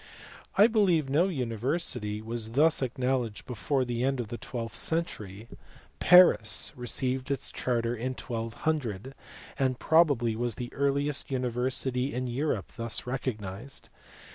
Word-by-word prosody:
l 200 Hz, -, +8 dB
I -, -, +9 dB
believe 180 Hz, -, +2 dB
no 165 Hz, +6 st, +3 dB
university 120 Hz, -, -2 dB
was 115 Hz, 0 st, -4 dB
thus 150 Hz, +4 st, +4 dB
ac 130 Hz, -2 st, -2 dB
knowledged 125 Hz, -4 st, -1 dB
before 130 Hz, +2 st, -1 dB
the 120 Hz, 0 st, -2 dB
end 135 Hz, 0 st, 0 dB
of 115 Hz, -3 st, -4 dB
the 120 Hz, -, -5 dB
twelfth 115 Hz, -2 st, -5 dB
century. 110 Hz, -, -1 dB, 0.5 s
Paris 180 Hz, -11 st, +6 dB
received 130 Hz, +2 st, -2 dB
its 140 Hz, -3 st, -2 dB
charter 120 Hz, -1 st, -1 dB
in 125 Hz, +3 st, -3 dB
1200, 120 Hz, 0 st, -3 dB, 0.5 s
and 130 Hz, -2 st, +1 dB
probably 140 Hz, -9 st, +3 dB
was 120 Hz, -1 st, -2 dB
the 120 Hz, -1 st, -6 dB
earliest 140 Hz, +1 st, 0 dB
university 125 Hz, 0 st, -1 dB
in 130 Hz, +1 st, -2 dB
Europe 125 Hz, -4 st, -2 dB
thus 115 Hz, -1 st, -1 dB
recognized. 125 Hz, -2 st, -5 dB
125 Hz, 135 wpm, -28 LUFS, 115-140 Hz, 0.5 s, I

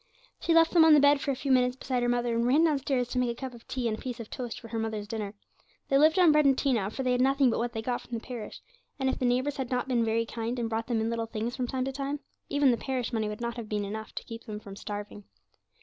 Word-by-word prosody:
She 335 Hz, -, +1 dB
left 330 Hz, 0 st, +6 dB
them 335 Hz, -2 st, +6 dB
on 320 Hz, -1 st, +8 dB
the -, -, +7 dB
bed 285 Hz, 0 st, +5 dB
for -, -, -3 dB
a 275 Hz, -, +1 dB
few 275 Hz, +2 st, -2 dB
minutes 250 Hz, -1 st, +3 dB
beside 255 Hz, -1 st, -2 dB
her 240 Hz, -, +1 dB
mother, 240 Hz, -1 st, +1 dB
and 235 Hz, +1 st, +1 dB
ran 290 Hz, +6 st, +4 dB
downstairs 275 Hz, -5 st, +1 dB
to 250 Hz, -, -1 dB
make 250 Hz, -1 st, +1 dB
a 235 Hz, -, -5 dB
cup 265 Hz, -2 st, -5 dB
of 235 Hz, -, -14 dB
tea 255 Hz, -2 st, -2 dB
and 220 Hz, -, 0 dB
a -, -, -12 dB
piece 250 Hz, -2 st, -5 dB
of 230 Hz, -, -8 dB
toast 245 Hz, -3 st, -5 dB
for 230 Hz, -1 st, -5 dB
mother's 220 Hz, -2 st, -3 dB
dinner. 210 Hz, -2 st, -4 dB, 0.5 s
They 275 Hz, -, +4 dB
lived 315 Hz, +4 st, +5 dB
on 355 Hz, -4 st, +7 dB
bread 300 Hz, 0 st, +4 dB
and 270 Hz, -1 st, +4 dB
tea 275 Hz, -2 st, +2 dB
now, 200 Hz, -4 st, 0 dB
for 265 Hz, +5 st, -4 dB
they 255 Hz, -, +1 dB
had 250 Hz, 0 st, +2 dB
nothing 270 Hz, -1 st, +4 dB
but -, -, -1 dB
what 235 Hz, 0 st, -2 dB
they 220 Hz, -1 st, -4 dB
got 245 Hz, +1 st, -1 dB
from 240 Hz, -, -5 dB
the 225 Hz, -, -10 dB
parish, 235 Hz, -4 st, -7 dB, 0.4 s
and 265 Hz, -1 st, 0 dB
if -, -, -2 dB
the 255 Hz, -, 0 dB
neighbours 255 Hz, +4 st, +1 dB
had 265 Hz, -3 st, -3 dB
not 250 Hz, 0 st, -1 dB
been 245 Hz, -3 st, +2 dB
very 225 Hz, +1 st, +1 dB
kind, 230 Hz, +2 st, -4 dB
and 235 Hz, -1 st, -1 dB
brought 225 Hz, 0 st, -2 dB
them 235 Hz, -3 st, 0 dB
in 225 Hz, +1 st, -1 dB
little 230 Hz, -1 st, -2 dB
things 225 Hz, +2 st, -3 dB
from 250 Hz, -2 st, -2 dB
time 255 Hz, +1 st, -2 dB
to 270 Hz, -, -2 dB
time, 280 Hz, +2 st, -3 dB, 0.3 s
even 285 Hz, -2 st, +4 dB
the 235 Hz, -, +1 dB
parish 255 Hz, -1 st, -3 dB
money 220 Hz, -2 st, 0 dB
would 210 Hz, +2 st, -6 dB
not 235 Hz, 0 st, -3 dB
have 225 Hz, -3 st, -6 dB
been 210 Hz, -1 st, -1 dB
enough 220 Hz, +2 st, -6 dB
to -, -, -4 dB
keep 230 Hz, 0 st, -9 dB
them 210 Hz, -3 st, -6 dB
from 200 Hz, -2 st, -10 dB
starving. 205 Hz, 0 st, -7 dB
245 Hz, 305 wpm, -28 LUFS, 225-265 Hz, 0.5 s, on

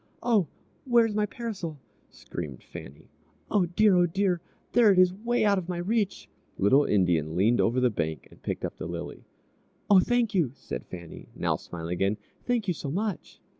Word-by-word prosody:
"Oh, 220 Hz, -8 st, +3 dB, 0.4 s
where's 235 Hz, -4 st, +3 dB
my 210 Hz, 0 st, +1 dB
parasol?" 195 Hz, -9 st, -5 dB, 0.3 s
screamed 75 Hz, -8 st, -7 dB
Fannie. 70 Hz, -, -11 dB, 0.4 s
"Oh, 190 Hz, -4 st, +3 dB
dear! 200 Hz, +3 st, +4 dB
oh, 175 Hz, 0 st, +5 dB
dear! 180 Hz, 0 st, 0 dB, 0.3 s
there 230 Hz, -4 st, +6 dB
it 190 Hz, -, +2 dB
is, 185 Hz, 0 st, +5 dB
'way 235 Hz, +3 st, 0 dB
out 200 Hz, -2 st, +4 dB
of 180 Hz, -1 st, -8 dB
my 180 Hz, -, -2 dB
reach!" 200 Hz, +3 st, -1 dB, 0.3 s
Little 135 Hz, +9 st, +4 dB
Indian 85 Hz, -6 st, +1 dB
leaned 110 Hz, +7 st, +3 dB
over 120 Hz, +3 st, +2 dB
the 125 Hz, -1 st, +3 dB
bank 80 Hz, -6 st, -3 dB
and -, -, -18 dB
picked -, -, -3 dB
up -, -, -6 dB
the -, -, -5 dB
lily. -, -, -6 dB, 0.7 s
"Oh, 195 Hz, -, +9 dB
thank 240 Hz, +2 st, +1 dB
you!" 160 Hz, -10 st, +1 dB
said 60 Hz, -, -7 dB
Fannie, 85 Hz, -3 st, -9 dB
now -, -, 0 dB
smiling 85 Hz, 0 st, -6 dB
again; 95 Hz, +4 st, 0 dB, 0.3 s
"thank 240 Hz, -4 st, 0 dB
you 180 Hz, -, +2 dB
so 145 Hz, -2 st, -6 dB
much!" 200 Hz, +4 st, -3 dB
180 Hz, 180 wpm, -27 LUFS, -, 0.7 s, Oh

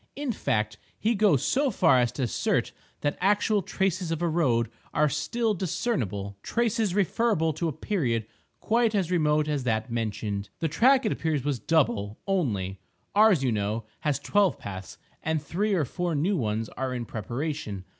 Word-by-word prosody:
In 285 Hz, -2 st, -2 dB
fact, 110 Hz, -, -1 dB, 0.2 s
he 225 Hz, +2 st, +1 dB
goes 195 Hz, -, +3 dB
so 280 Hz, +1 st, +2 dB
far 165 Hz, -, +4 dB
as 120 Hz, -1 st, +2 dB
to 135 Hz, -, -2 dB
assert 120 Hz, -, 0 dB, 0.3 s
that 145 Hz, -, -1 dB
actual 205 Hz, +2 st, +3 dB
traces 185 Hz, -2 st, -1 dB
of 165 Hz, -1 st, -1 dB
a -, -, +2 dB
road 125 Hz, -9 st, +1 dB, 0.2 s
are 150 Hz, +1 st, +4 dB
still 230 Hz, -, 0 dB
discernible—traces 180 Hz, -, -1 dB
referable 200 Hz, -5 st, +2 dB
to 165 Hz, +3 st, -2 dB
a -, -, 0 dB
period 135 Hz, -, -1 dB, 0.3 s
quite 230 Hz, -1 st, +2 dB
as 185 Hz, -4 st, 0 dB
remote 155 Hz, -3 st, +2 dB
as 145 Hz, -3 st, -1 dB
that 110 Hz, -1 st, 0 dB
mentioned. 105 Hz, -3 st, -2 dB
The 165 Hz, -, 0 dB
track, 260 Hz, -, +4 dB
it 215 Hz, -, +1 dB
appears 155 Hz, -5 st, -1 dB
was 140 Hz, -3 st, -1 dB
double 115 Hz, -10 st, +1 dB
only; 105 Hz, -, -1 dB, 0.3 s
ours, 205 Hz, -8 st, +5 dB
you 130 Hz, -, +2 dB
know, 105 Hz, +1 st, -1 dB
has 150 Hz, -3 st, 0 dB
twelve 205 Hz, -2 st, +2 dB
paths; 95 Hz, -1 st, -8 dB, 0.2 s
and 160 Hz, 0 st, 0 dB
three 195 Hz, +8 st, -1 dB
or 160 Hz, -5 st, +1 dB
four 175 Hz, +5 st, -2 dB
new 175 Hz, +8 st, +1 dB
ones 110 Hz, -6 st, -1 dB
are 130 Hz, -1 st, -3 dB
in 120 Hz, -1 st, -3 dB
preparation. 115 Hz, -, -4 dB
155 Hz, 165 wpm, -27 LUFS, -, 0.3 s, ours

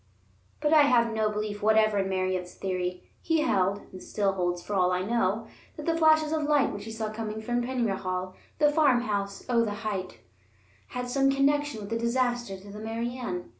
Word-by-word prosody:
But 300 Hz, +1 st, +2 dB
I 310 Hz, -, +8 dB
have 240 Hz, -5 st, +4 dB
no 220 Hz, -1 st, +1 dB
belief 210 Hz, 0 st, -4 dB
whatever 215 Hz, -1 st, +4 dB
in 190 Hz, 0 st, 0 dB
Merritt's 185 Hz, -1 st, -2 dB
theory. 180 Hz, -1 st, -3 dB, 0.2 s
He 325 Hz, -1 st, +1 dB
held 200 Hz, -8 st, +1 dB
(and 185 Hz, -, -10 dB
still 200 Hz, -2 st, 0 dB
holds, 175 Hz, -2 st, -1 dB
for 210 Hz, -, -5 dB
all 185 Hz, -2 st, +3 dB
I 180 Hz, 0 st, 0 dB
know), 225 Hz, 0 st, 0 dB, 0.3 s
that 300 Hz, -, -6 dB
the 330 Hz, -, +1 dB
flashes 315 Hz, -1 st, +4 dB
of 315 Hz, -1 st, 0 dB
light 295 Hz, -2 st, +2 dB
which 205 Hz, 0 st, -7 dB
he 225 Hz, -, -6 dB
saw 220 Hz, -1 st, -3 dB
coming 215 Hz, -1 st, -4 dB
from 240 Hz, +2 st, -1 dB
Penyrhaul, 195 Hz, -7 st, -2 dB, 0.2 s
the 295 Hz, -1 st, +4 dB
farmhouse 240 Hz, -10 st, +1 dB
on 235 Hz, -2 st, +3 dB
the 205 Hz, -1 st, -3 dB
height, 190 Hz, -4 st, -3 dB, 0.7 s
had 250 Hz, 0 st, -4 dB
some 270 Hz, +2 st, +2 dB
connection 280 Hz, -2 st, +1 dB
with 200 Hz, +1 st, -8 dB
the 230 Hz, -, 0 dB
disaster 240 Hz, -3 st, 0 dB
to 200 Hz, +2 st, -12 dB
the 210 Hz, -, -8 dB
Mary 225 Hz, +2 st, -3 dB
Ann. 180 Hz, -9 st, -4 dB
220 Hz, 195 wpm, -28 LUFS, 195-255 Hz, 0.7 s, I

